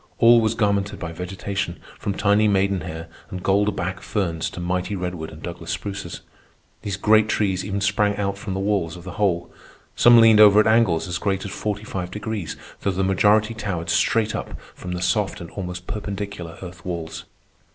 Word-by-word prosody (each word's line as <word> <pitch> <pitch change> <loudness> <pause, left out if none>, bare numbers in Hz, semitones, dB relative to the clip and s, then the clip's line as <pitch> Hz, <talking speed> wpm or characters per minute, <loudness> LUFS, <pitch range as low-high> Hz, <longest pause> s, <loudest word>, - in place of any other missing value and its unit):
All 115 0 +7
was 110 0 +1
garmented 100 -2 0
by 80 - -5
vegetation, 90 +1 -4 0.2
from 100 - -2
tiny 105 +1 +3
maiden 100 -2 +2
hair 80 +1 -6 0.2
and 90 -1 -6
gold 100 +2 +2
back 90 +1 -3
ferns 85 -6 -2
to - - -9
mighty 90 +3 -2
redwood 90 -3 -4
and 80 0 -12
Douglas 85 -1 -7
spruces. 100 -1 -5 0.6
These 100 -2 -3
great 110 +1 +4
trees 95 -4 0
even 100 0 -3
sprang 105 0 +1
out 100 -1 -1
from 100 -1 -5
the - - -2
walls 95 -4 0
of 90 - -11
the 95 - -7
hole. 85 -4 0 0.4
Some 120 -1 +7
leaned 115 -1 +7
over 105 -1 +8
at 110 - +5
angles 110 -6 +3
as 90 -1 -3
great 95 0 -1
as 100 - -5
forty 105 0 -3
five 90 -4 -4
degrees, 105 -2 -4 0.2
though - - -1
the 95 0 0
majority 105 +3 +3
towered 100 -6 -3
straight 110 -1 +2
up - - -6
from 90 - -6
the 90 0 -3
soft 95 +3 0
and 85 -2 -9
almost 90 -2 -6
perpendicular 100 -4 -5
earth 90 -1 -10
walls. 85 -2 -5
100 Hz, 190 wpm, -23 LUFS, 90-105 Hz, 0.6 s, over